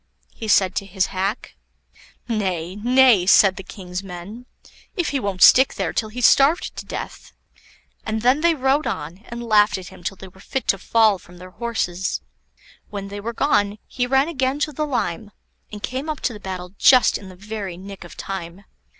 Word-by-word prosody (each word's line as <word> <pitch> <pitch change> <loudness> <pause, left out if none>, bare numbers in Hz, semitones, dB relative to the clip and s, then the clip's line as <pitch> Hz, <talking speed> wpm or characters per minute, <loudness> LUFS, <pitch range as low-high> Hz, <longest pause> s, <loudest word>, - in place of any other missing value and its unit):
he 225 - -7
said 190 -3 +4
to - - -2
his 190 -1 -1
hack. 195 +5 -3 0.7
"Nay, 185 -6 -2
nay," 240 -3 +4
said 195 -1 +6
the 195 - -7
King's 185 -1 -7
men; 195 +6 -9 0.5
"if 350 -4 0
he 280 - -1
won't 195 -7 0
stick 260 - +7
there - - -2
till 220 - -1
he's 245 +2 -1
starved 285 +5 +4
to - - -8
death." - - -7 0.7
And 220 0 -3
then 255 +5 +3
they 335 0 +3
rode 270 +2 +1
on, 165 +5 -5
and 235 0 -6
laughed 210 -3 +4
at 185 -1 -9
him - - -15
till 190 +2 -4
they 190 - -10
were 190 +1 -17
fit 265 +5 -4
to 195 - +2
fall 215 -1 +3
from 175 +1 -16
their 185 +1 -12
horses. 190 -5 -2 0.7
When 200 -1 -6
they 205 +1 -6
were 225 +3 -4
gone, 210 -5 +1
he 245 -1 -2
ran 270 +3 +3
again 270 -4 -1
to 310 - 0
the 305 +2 -2
lime, 215 - -2 0.4
and 210 -1 -9
came 265 +4 -4
up 305 -3 -3
to 245 - -1
the 210 - -9
battle 185 -2 -6
just 255 -2 +5
in 195 - -11
the 185 - -12
very 200 -2 -6
nick 195 +1 -10
of 175 - -13
time. 190 0 -6
205 Hz, 195 wpm, -22 LUFS, 190-250 Hz, 0.7 s, stick